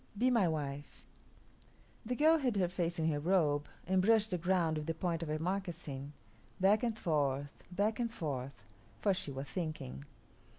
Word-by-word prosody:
Be 250 Hz, +4 st, +3 dB
my 225 Hz, -7 st, +4 dB
wife." 145 Hz, -3 st, -4 dB, 1.0 s
The 250 Hz, +2 st, -2 dB
girl 315 Hz, +4 st, +5 dB
hid 250 Hz, -6 st, 0 dB
her 185 Hz, -3 st, +2 dB
face 175 Hz, -1 st, -1 dB
in 160 Hz, -1 st, +1 dB
her 145 Hz, -, -1 dB
robe 150 Hz, -3 st, +2 dB, 0.2 s
and 190 Hz, 0 st, +3 dB
brushed 220 Hz, +1 st, +4 dB
the 180 Hz, -, 0 dB
ground 170 Hz, -2 st, +2 dB
with 150 Hz, -, -6 dB
the 165 Hz, -, -1 dB
point 170 Hz, 0 st, -1 dB
of 165 Hz, -, -4 dB
her 155 Hz, -, 0 dB
moccasin, 165 Hz, -6 st, -3 dB, 0.5 s
back 200 Hz, +3 st, +5 dB
and 230 Hz, -3 st, -1 dB
forth, 145 Hz, -5 st, -1 dB
back 205 Hz, +5 st, 0 dB
and 235 Hz, -1 st, 0 dB
forth, 135 Hz, -, -4 dB, 0.4 s
for 200 Hz, -, +3 dB
she 185 Hz, -5 st, -3 dB
was 135 Hz, 0 st, -4 dB
thinking. 155 Hz, -, -4 dB
170 Hz, 175 wpm, -34 LUFS, 145-200 Hz, 1.0 s, girl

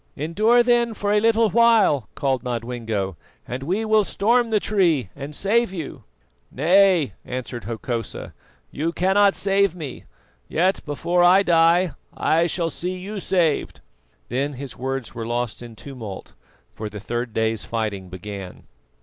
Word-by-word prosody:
"Endure 215 Hz, -, +3 dB
then 240 Hz, -2 st, +2 dB
a 205 Hz, +1 st, +2 dB
little 225 Hz, -1 st, +3 dB
while," 220 Hz, -, +4 dB
called 135 Hz, -2 st, 0 dB
Nodwengo, 115 Hz, -6 st, -3 dB, 0.3 s
"and 125 Hz, +2 st, -4 dB
we 190 Hz, +10 st, -1 dB
will 215 Hz, -1 st, +4 dB
storm 235 Hz, +4 st, +2 dB
the 215 Hz, -1 st, +2 dB
tree 170 Hz, -, +1 dB
and 145 Hz, +1 st, -7 dB
save 225 Hz, +4 st, +1 dB
you." 165 Hz, -7 st, -7 dB, 0.4 s
"Nay," 175 Hz, +1 st, +3 dB
answered 125 Hz, -3 st, -6 dB
Hokosa, 115 Hz, 0 st, -5 dB, 0.4 s
"you 160 Hz, +4 st, -2 dB
cannot 195 Hz, +3 st, +3 dB
save 195 Hz, -2 st, +2 dB
me; 150 Hz, -7 st, -7 dB, 0.4 s
yet 185 Hz, +4 st, +1 dB
before 175 Hz, +4 st, +1 dB
I 185 Hz, +3 st, +6 dB
die 170 Hz, 0 st, +4 dB, 0.2 s
I 165 Hz, +2 st, +2 dB
shall 165 Hz, 0 st, -1 dB
see 180 Hz, +1 st, -4 dB
you 200 Hz, +3 st, -6 dB
saved." 175 Hz, -5 st, 0 dB, 0.5 s
Then 140 Hz, +4 st, -1 dB
his 135 Hz, 0 st, -8 dB
words 130 Hz, -1 st, -4 dB
were 115 Hz, -1 st, -5 dB
lost 120 Hz, -1 st, -2 dB
in 120 Hz, -2 st, -10 dB
tumult, 115 Hz, -6 st, -9 dB, 0.4 s
for 110 Hz, -1 st, -6 dB
the 105 Hz, 0 st, -8 dB
third 120 Hz, +3 st, -3 dB
day's 110 Hz, 0 st, -1 dB
fighting 105 Hz, -5 st, -3 dB
began. 95 Hz, 0 st, -8 dB
155 Hz, 140 wpm, -23 LUFS, 120-195 Hz, 0.5 s, I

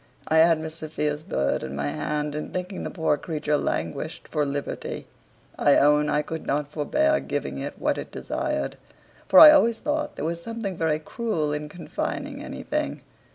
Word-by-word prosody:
I 160 Hz, -, +3 dB
had 165 Hz, 0 st, +6 dB
Miss 160 Hz, 0 st, -5 dB
Sophia's 150 Hz, -1 st, -2 dB
bird 70 Hz, -, -1 dB
in 65 Hz, +1 st, -5 dB
my 70 Hz, +1 st, -1 dB
hand, 150 Hz, -, -2 dB
and 150 Hz, +1 st, -5 dB
thinking 185 Hz, +1 st, -4 dB
the -, -, -3 dB
poor 160 Hz, -4 st, +1 dB
creature 150 Hz, -3 st, -1 dB
languished 145 Hz, -, -3 dB
for 150 Hz, -2 st, 0 dB
liberty, 140 Hz, 0 st, -4 dB, 0.5 s
I 145 Hz, -, +5 dB
own 150 Hz, +1 st, +4 dB
I 150 Hz, -, +1 dB
could 160 Hz, +1 st, -6 dB
not 145 Hz, +1 st, -1 dB
forbear 305 Hz, -, +2 dB
giving -, -, -3 dB
it -, -, -5 dB
what -, -, 0 dB
it -, -, -7 dB
desired; -, -, -3 dB, 0.5 s
for -, -, +8 dB
I 310 Hz, -1 st, +12 dB
always 235 Hz, -7 st, +4 dB
thought 295 Hz, +2 st, -2 dB
there -, -, -4 dB
was 170 Hz, +1 st, -2 dB
something 225 Hz, -2 st, -4 dB
very 160 Hz, -2 st, +1 dB
cruel 160 Hz, -, -2 dB
in 150 Hz, 0 st, -4 dB
confining 170 Hz, +2 st, -4 dB
anything. -, -, -3 dB
155 Hz, 175 wpm, -25 LUFS, 150-180 Hz, 0.5 s, I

